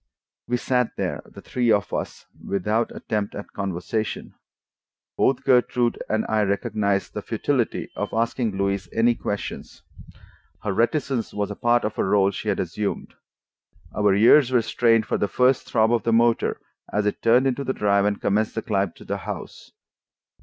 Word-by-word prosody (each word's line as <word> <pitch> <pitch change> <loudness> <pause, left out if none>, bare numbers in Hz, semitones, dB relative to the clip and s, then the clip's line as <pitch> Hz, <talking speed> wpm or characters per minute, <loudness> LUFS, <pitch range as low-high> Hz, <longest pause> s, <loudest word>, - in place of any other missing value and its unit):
We 125 - +1
sat 125 -1 0
there, - - -2
the - - -14
three 120 -2 0
of 100 -2 +1
us, - - -4 0.2
without 105 +4 0
attempt 105 -2 -3
at 100 - -8
conversation. 100 +3 -3 0.8
Both 135 0 +1
Gertrude 125 -2 +2
and 110 0 0
I 110 -1 +1
recognized 100 -1 0
the - - -4
futility - - -1
of - - -3
asking 115 -2 -1
Louise 100 -2 -1
any 115 +1 +3
questions: 105 -3 -6 0.8
her 100 - -1
reticence 120 +1 0
was 105 0 -2
a - - -5
part 120 +2 +2
of 105 - -3
a - - +3
role 100 0 +3
she 105 +2 -4
had 100 - 0
assumed. 100 +3 -3 0.8
Our 105 -1 +3
ears 120 +6 +6
were 125 -3 +2
strained 115 -2 +2
for - - -1
the 105 - +1
first 125 +4 +2
throb 110 0 +2
of 120 - +2
the 115 - 0
motor 115 0 +2 0.3
as 105 0 0
it 105 - -1
turned 120 +3 +4
into 135 +1 0
the 130 - -1
drive 100 -4 +2
and 105 -1 0
commenced 105 +2 0
the 110 - -2
climb 100 -4 0
to - - -15
the - - -2
house. - - -8
110 Hz, 170 wpm, -23 LUFS, 100-120 Hz, 0.8 s, ears